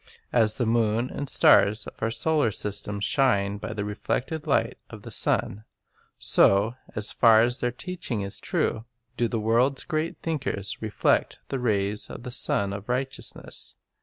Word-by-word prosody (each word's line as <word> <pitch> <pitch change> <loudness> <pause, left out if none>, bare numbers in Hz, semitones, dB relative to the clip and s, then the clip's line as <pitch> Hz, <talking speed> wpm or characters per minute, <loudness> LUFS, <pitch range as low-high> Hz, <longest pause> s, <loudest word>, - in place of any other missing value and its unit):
As 110 -3 +4
the 120 - +1
moon 115 +1 +1
and 145 - -4
the - - -1
stars 105 +2 +5
of - - -11
our 115 - +1
solar 150 +1 +1
system 100 0 -3
shine 100 -3 +1
by 110 +2 -5
the 105 -2 -3
reflected 135 +9 -3
light 140 - +1
of - - -11
the - - -9
sun, 105 +2 -1 0.5
so, 100 +4 +4 0.2
as 105 0 -3
far 115 -2 +6
as 120 +2 0
their 125 - 0
teaching 155 - -5
is 100 0 -4
true, 110 - -1 0.3
do 120 0 +1
the 115 - -2
world's 120 +5 +1
great 160 0 -2
thinkers 130 - -2
reflect 110 -1 +1
the 135 - -2
rays 105 -3 0
of 120 - -9
the 125 - -6
Sun 100 -5 0
of 100 +3 -8
Righteousness. 130 +2 -4
115 Hz, 165 wpm, -26 LUFS, 105-130 Hz, 0.5 s, far